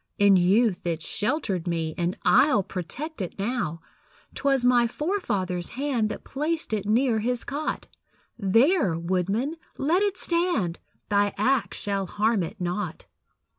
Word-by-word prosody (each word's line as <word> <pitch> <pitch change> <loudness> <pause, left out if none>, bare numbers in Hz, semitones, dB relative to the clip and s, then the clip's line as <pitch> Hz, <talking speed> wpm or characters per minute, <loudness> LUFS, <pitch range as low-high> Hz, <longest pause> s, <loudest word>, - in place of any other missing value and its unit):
In 200 -1 +6
youth 190 +2 +3
it 165 -2 -2
sheltered 210 - -1
me, 165 -2 -1
And 175 +1 -1
I'll 265 -9 +5
protect 210 - -5
it 180 - -5
now. 195 -7 -2 0.5
'Twas 270 -3 +1
my 245 -1 +5
forefather's 210 - -2
hand 260 -6 0
That - - -6
placed 305 -1 -2
it 205 -2 -1
near 230 +1 +2
his 245 +2 -1
cot; 290 +2 -3 0.5
There, 225 - +3
woodman, 190 - -1 0.2
let 325 +7 +2
it 405 -2 0
stand, 335 - 0 0.3
Thy 205 0 +2
axe 230 0 +1
shall 200 -2 -2
harm 215 +2 +1
it 195 +5 -5
not. 180 0 -3
215 Hz, 135 wpm, -26 LUFS, 185-275 Hz, 0.5 s, In